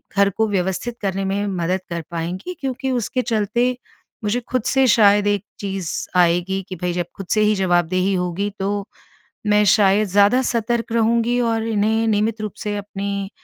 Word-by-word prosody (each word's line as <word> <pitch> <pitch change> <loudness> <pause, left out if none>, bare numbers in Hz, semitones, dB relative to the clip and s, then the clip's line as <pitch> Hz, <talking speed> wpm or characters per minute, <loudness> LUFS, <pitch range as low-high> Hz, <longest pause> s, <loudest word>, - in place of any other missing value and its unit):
घर 200 0 +4
को 220 - +2
व्यवस्थित 190 +5 -2
करने 195 -1 -1
में 200 +2 -1
मदद 185 -1 -1
कर 170 -1 -3
पाएँगी। 175 - -4
क्योंकि 265 -1 -3
उसके 250 +1 -1
चलते 225 0 0 0.6
मुझे 210 +4 +1
खुद 255 -3 0
से 270 0 +3
शायद 205 -2 +5
एक 205 -2 +1 0.2
चीज़ 195 -4 -3 0.3
आएगी 180 +2 +2
कि 185 - -5
भई, 180 +1 -2
जब 175 0 -1
खुद 195 - -7
से 215 - +2
ही 210 0 +3
जवाबदेही 185 0 +1
होगी, 180 +3 -1
तो 200 +1 -2 0.6
मैं 210 0 +4
शायद 205 0 +4
ज़्यादा 205 +7 +4
सतर्क 235 -1 -1
रहूँगी 235 +1 +2
और 225 -2 0
इन्हें 220 +1 +1
नियमित 215 +1 0
रूप 210 -2 -4
से 205 -1 -2
अपनी 200 -1 -4
205 Hz, 170 wpm, -21 LUFS, 190-225 Hz, 0.6 s, शायद